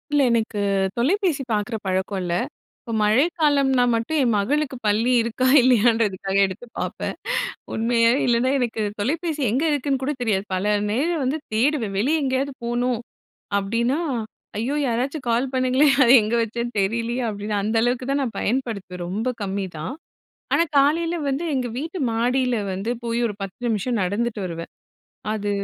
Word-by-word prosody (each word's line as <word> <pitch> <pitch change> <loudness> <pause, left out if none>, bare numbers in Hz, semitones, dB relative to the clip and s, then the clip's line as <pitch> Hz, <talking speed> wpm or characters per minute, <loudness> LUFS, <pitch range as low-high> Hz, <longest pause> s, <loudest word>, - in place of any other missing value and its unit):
இல்ல, 290 - +4
எனக்குத் 200 -4 0
தொலைபேசி 320 - +1
பாக்குற 210 +2 -1
பழக்கம் 190 +1 -1
இல்ல. 175 -1 -2 0.5
இப்ப 230 - -8
மழைக்காலம்னா 275 +2 +3
மட்டும் 230 +8 0
என் 245 - +2
மகளுக்குப் 265 +4 -1
பள்ளி 220 +4 +2
இருக்கா 235 +3 -1
இல்லையான்றதுக்காக 225 -6 +2
எடுத்துப் 210 +5 -9
பாப்பேன். - - -3 0.6
உண்மையா, 230 0 +3
இல்லன்னா 240 +1 +2
எனக்குத் 220 -4 -2
தொலைபேசி 305 - -1
எங்க 255 +7 0
இருக்குன்னு 280 -2 0
கூடத் 265 -1 -2
தெரியாது. 205 -5 0
பல 200 +3 +1 0.2
நேரம் 310 +9 0
வந்து 270 +5 0 0.2
தேடுவேன். 235 -3 +1
வெளிய 295 +10 +2
எங்கேயாது 270 +1 0
போணும் 240 0 0 0.6
அப்டின்னா, 230 +8 0 0.6
ஐயோ 255 +6 -1
யாராச்சும் 255 +5 -2
கால் 240 +3 +1
பண்ணுங்களே 260 +3 +3 0.2
அத 235 - +3
எங்க 215 +2 -1
வச்சேன்னு 235 +1 -3
தெரிலயே 230 +5 -1
அப்டின்னு 205 0 -3
அந்த 220 +2 -1
அளவுக்குத் 250 +2 0
தான் 280 +1 +1
நான் 230 -5 -4
பயன்படுத்துவேன். 205 -7 -2
ரொம்ப 210 +7 -2
கம்மி 195 0 -2
தான். 155 +10 -4 0.6
ஆனா 335 - +4
காலையில 330 +5 +3
வந்து 275 +4 -1
எங்க 255 -2 -1
வீட்டு 320 +5 -5
மாடில 250 +2 +1 0.2
வந்து 195 +5 -3 0.2
போயி 230 0 -1
ஒரு 205 - -6
10 195 -1 -8
நிமிஷம் 230 +2 0
நடந்துட்டு 210 +4 -1
வருவேன். 165 -1 -6 0.6
அது 205 -1 -2
235 Hz, 145 wpm, -23 LUFS, 210-265 Hz, 0.6 s, இல்ல